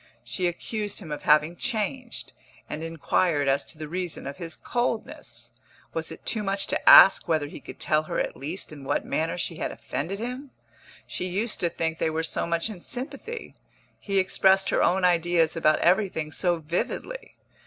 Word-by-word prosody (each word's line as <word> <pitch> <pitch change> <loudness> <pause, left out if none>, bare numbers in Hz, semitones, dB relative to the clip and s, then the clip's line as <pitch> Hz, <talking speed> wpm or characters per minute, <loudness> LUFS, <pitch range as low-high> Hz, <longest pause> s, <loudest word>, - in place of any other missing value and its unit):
She 180 -2 -1
accused 205 +4 -3
him 170 -7 -7
of 150 - -4
having 150 +3 +4
changed, 240 +3 -3 0.3
and 150 - -5
inquired 165 -2 +1
as 135 +1 +2
to 160 - -7
the 155 0 -6
reason 175 +1 -4
of 140 +1 -6
his 165 -1 -6
coldness. 165 - -3 0.4
Was 165 0 -2
it 160 - -11
too 220 - 0
much 195 -1 0
to - - +3
ask 195 - +9
whether 160 -3 +1
he 145 - -9
could - - -11
tell 155 0 +2
her - - -1
at - - -2
least 160 +7 -5
in 145 -2 -10
what 135 - -1
manner 160 +2 -1
she 170 -1 -3
had - - -2
offended 175 +8 -4
him? 250 +5 -5 0.6
She 185 - -3
used 210 +5 -2
to 170 - +1
think 160 -1 -2
they - - +1
were 160 +1 -1
so 165 - -1
much 170 +2 0
in 205 -6 -8
sympathy 280 - -4 0.5
he 200 -1 -2
expressed 190 0 +4
her - - +2
own 185 +1 +3
ideas 170 -2 +3
about 155 -2 +3
everything 175 -4 +2
so 175 +1 +1
vividly. 180 - -4
175 Hz, 185 wpm, -26 LUFS, 160-200 Hz, 0.6 s, ask